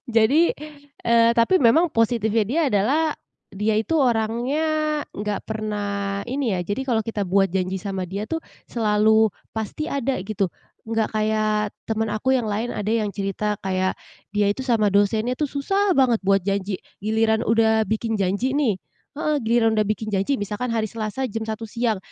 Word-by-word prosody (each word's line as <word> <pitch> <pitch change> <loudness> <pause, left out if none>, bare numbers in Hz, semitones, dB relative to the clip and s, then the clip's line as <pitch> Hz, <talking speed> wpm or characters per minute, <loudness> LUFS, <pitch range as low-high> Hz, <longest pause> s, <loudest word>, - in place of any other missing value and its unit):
Jadi, 280 +10 +4 0.5
eee, 230 0 +5
tapi 235 +11 +4
memang 320 +6 +4
positifnya 225 -2 +1
dia 290 +10 0
adalah 215 +10 +2 0.5
dia 210 +2 -1
itu 325 +8 0
orangnya 240 +2 +1 0.5
enggak 205 0 -3
pernah, 205 -2 -3
ini 260 -5 0
ya, 180 - -1
jadi 205 +9 -3
kalau 230 -4 +1
kita 210 -2 -3
buat 195 +1 +2
janji 185 0 -2
sama 195 -2 -3
dia 200 +4 -5
tuh 325 - -1 0.3
selalu 220 -1 +3 0.2
pasti 220 +8 -4
ada, 270 -6 -1
gitu. 200 0 -1 0.4
Enggak 225 -1 0
kayak 215 -1 +1 0.2
temen 220 0 0
aku 260 +5 +1
yang 235 - -2
lain, 215 +3 -2
ada 210 +1 -2
yang 215 -3 0
cerita 200 +1 -2
kayak 185 0 0 0.3
dia 205 0 +1
itu 265 - -6
sama 225 -6 +1
dosennya 215 +4 +2
tuh 290 +2 -2
susah 390 +6 +1
banget 245 -5 +3
buat 195 -1 +2
janji. 195 -1 -1 0.2
Giliran 220 +1 +2
udah 220 -1 +2
bikin 220 +1 -1
janji 200 +8 0
nih 260 -10 +1 0.4
heeh, 305 -2 0
giliran 225 0 +2
udah 215 - +2
bikin 215 0 -2
janji, 200 +8 +1
misalkan 210 +4 -3
hari 225 -1 0
Selasa 220 +4 -3
jam 225 -2 -4
1.00 220 0 -4
siang, 230 0 -1
220 Hz, 165 wpm, -23 LUFS, 205-240 Hz, 0.5 s, eee